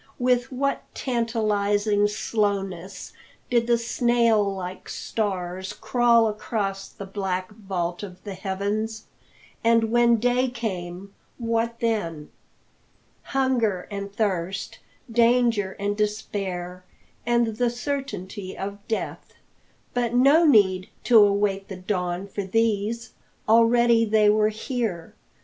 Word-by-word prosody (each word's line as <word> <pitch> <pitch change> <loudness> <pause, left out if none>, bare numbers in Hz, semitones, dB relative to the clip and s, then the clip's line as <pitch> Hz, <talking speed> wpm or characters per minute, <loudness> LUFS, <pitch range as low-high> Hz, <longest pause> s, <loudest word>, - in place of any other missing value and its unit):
With 250 0 +1
what 275 +2 -1
tantalising 210 -4 +1
slowness 195 -3 -2 0.4
did 235 -1 +2
the 235 -1 +4
snail 235 -2 +2
like 185 0 -7
stars 190 -2 -3
crawl 235 +1 +3
across 205 -2 -3
the 200 - -9
black 190 -1 -3
vault 185 -5 -4
of 185 -3 -9
the 200 - -6
heavens! 205 +4 -3 0.6
And 230 -1 +3
when 240 0 +5
day 245 +3 +2
came, 195 -5 -5 0.2
what 230 0 -1
then? 170 -10 -2 0.9
Hunger 245 -9 0
and 200 0 -5
thirst, 195 -3 -2 0.3
danger 230 -4 +3
and 205 0 -1
despair, 195 -4 -3 0.4
and 235 -2 +1
the 245 0 +2
certainty 235 -7 -5
of 200 +1 -5
death! 225 - -4 0.6
But 240 -1 0
no 280 +7 +6
need 190 -8 +4
to 235 -2 +6
await 200 -1 +2
the 190 - -7
dawn 180 -1 -2
for 200 - -4
these; 225 +2 -1 0.3
already 230 +1 +5
they 210 -1 +4
were 215 0 +3
here. 215 -6 -3
210 Hz, 110 wpm, -24 LUFS, 195-235 Hz, 0.9 s, no